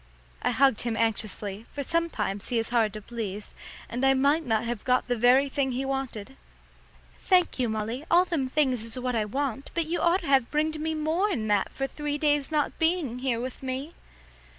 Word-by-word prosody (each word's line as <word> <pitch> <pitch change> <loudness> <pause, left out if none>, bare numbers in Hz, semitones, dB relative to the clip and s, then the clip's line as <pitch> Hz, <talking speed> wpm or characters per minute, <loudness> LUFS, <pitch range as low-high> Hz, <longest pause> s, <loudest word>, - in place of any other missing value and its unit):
I - - +1
hugged 270 -5 +3
him 235 -2 -2
up - - 0
anxiously, 215 -1 -3
for 285 - -4
sometimes 235 -12 -1
he 240 - 0
is 225 - -1
hard 230 -3 +2
to 215 -1 -7
please, 210 -3 -5 0.3
and 245 +3 -4
I 270 0 +5
might 285 +5 +3
not 225 -4 0
have 235 -2 -3
got 250 -1 +2
the 245 - +1
very 250 +4 +5
thing 270 -1 -1
he 260 +2 -2
wanted. 270 -3 -4 0.8
"Thank 360 -7 +2
you, 245 -2 +1
Molly, 220 +5 -3
all 350 +2 +5
them 320 -7 -1
things 260 -4 +1
is 230 +2 -4
what 250 0 -2
I 220 -2 +1
want, 270 +3 -3
but 335 -1 +1
you 335 +3 -2
oughter 345 +1 +2
have 270 -4 +3
bringed 310 +1 0
more'n 315 - 0
that 205 -2 +2
for 270 - -2
three 295 +1 -3
days 295 -1 +1
not 300 -2 0
being 320 -7 0
here 250 -3 0
with 255 +2 -5
me." 265 +4 -4
265 Hz, 200 wpm, -27 LUFS, 230-300 Hz, 0.8 s, I